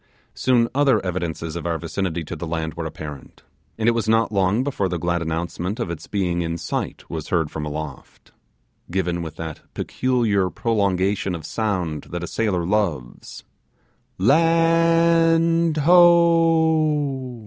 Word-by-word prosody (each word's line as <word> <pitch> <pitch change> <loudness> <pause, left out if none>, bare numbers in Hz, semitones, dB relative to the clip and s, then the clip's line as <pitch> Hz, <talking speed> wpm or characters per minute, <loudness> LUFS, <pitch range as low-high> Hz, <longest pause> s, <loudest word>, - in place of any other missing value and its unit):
Soon, 120 -2 +2
other 140 0 +3
evidences 85 -3 -3
of 85 - -4
our 85 -1 -1
vicinity 85 0 -3
to - - -6
the 85 - -6
land 80 -1 -3
were 85 -1 -4
apparent, 75 -3 -10 0.3
and 110 0 -1
it - - +6
was 115 -2 -1
not 115 0 +2
long 100 +4 +1
before 130 -9 -1
the 90 - -2
glad 85 +1 -1
announcement 85 +5 -3
of 105 -8 -2
its 85 -1 -7
being 90 -4 -1
in 85 0 -2
sight 85 - -4
was 80 -2 -6
heard 80 -4 0
from 75 -1 -4
aloft, 75 -2 -8 0.6
given 90 -1 -1
with 80 -1 -7
that 80 -2 -7
peculiar 115 -7 0
prolongation 100 -3 0
of 80 -2 -8
sound 90 -9 -2
that 85 0 -6
a - - -4
sailor 100 -7 -1
loves 90 - -2 0.7
'Land 165 - +3
ho! 160 -5 +3
95 Hz, 145 wpm, -22 LUFS, 85-140 Hz, 0.7 s, it